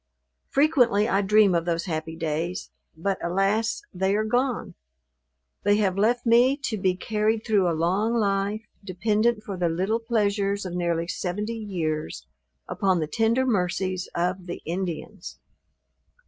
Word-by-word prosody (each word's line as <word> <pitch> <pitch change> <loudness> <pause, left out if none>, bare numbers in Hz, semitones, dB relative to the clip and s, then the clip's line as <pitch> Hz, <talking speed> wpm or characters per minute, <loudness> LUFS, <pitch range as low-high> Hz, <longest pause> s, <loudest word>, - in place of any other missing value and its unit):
Frequently 250 -8 +3
I 195 -3 +2
dream 205 -1 +4
of 170 -1 +1
those 170 -1 -1
happy 160 -2 -4
days: 165 +2 -3 0.3
but, 195 +4 -2
alas! 195 +6 0
they 190 +2 +1
are 215 - +1
gone; 245 +3 -1 0.9
they 205 +1 +3
have 195 -3 +1
left 235 +5 +1
me 245 +4 +5
to 220 -5 -2
be 185 -1 +1
carried 215 +3 -1
through 200 -6 +3
a 165 - -1
long 195 +8 +1
life, 205 0 0 0.2
dependent 210 +4 0
for 200 -3 -5
the 175 -1 +1
little 190 +7 0
pleasures 205 -3 0
of 180 - -5
nearly 170 -1 -1
seventy 205 +6 -3
years, 155 - -3 0.4
upon 190 -3 +1
the 155 - 0
tender 225 +10 +1
mercies 185 -4 -1
of 180 +1 -1
the 175 - -6
Indians! 180 +3 -5
195 Hz, 145 wpm, -25 LUFS, 175-220 Hz, 0.9 s, me